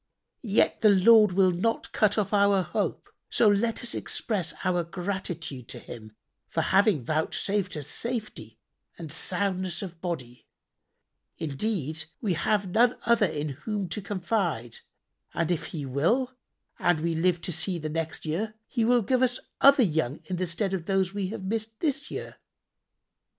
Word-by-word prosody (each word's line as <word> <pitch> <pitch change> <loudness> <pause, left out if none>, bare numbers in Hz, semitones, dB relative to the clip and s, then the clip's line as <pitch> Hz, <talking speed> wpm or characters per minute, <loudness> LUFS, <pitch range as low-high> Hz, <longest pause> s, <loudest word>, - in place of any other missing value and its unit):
Yet 215 -1 +2
the 215 - +6
Lord 210 +1 +6
will 185 0 +4
not 210 +6 -1
cut 215 0 +2
off 205 -1 0
our 200 -2 +4
hope; - - -2 0.2
so 230 - +4
let 215 +4 +2
us 240 - 0
express 190 -7 -1
our 175 -1 +1
gratitude 170 - -4
to - - -7
Him 110 -2 -10 0.3
for - - -1
having 190 - +3
vouchsafed 160 - -1
us 145 - -4
safety 230 - -4 0.4
and 160 -3 -7
soundness 185 +1 0
of 175 -3 -9
body: 130 -9 -5 0.9
indeed, 160 0 -2
we 205 -6 0
have 195 +3 0
none 240 +4 +4
other 230 -3 +4
in 150 -2 -3
whom 195 - -4
to 210 - -3
confide, 180 - -2 0.6
and 170 0 0
if 170 - -1
He 150 -4 -5
will 200 - +1 0.5
and 175 -3 +2
we 165 +1 0
live 175 +2 +2
to - - -3
see 170 +3 0
the 155 -2 -4
next 160 +1 -3
year, 210 +8 -2
He 240 - -2
shall 240 +1 +4
give 255 +5 +1
us 250 -1 +2 0.2
other 275 -1 +7
young 160 - 0
in 180 +3 -3
the 185 +1 -1
stead 190 +3 -1
of 175 -3 -3
those 195 -1 +1
we 200 -2 -2
have 210 0 -6
missed 220 +2 -3
this 285 -3 -1
year." - - -6
185 Hz, 160 wpm, -27 LUFS, 160-215 Hz, 0.9 s, other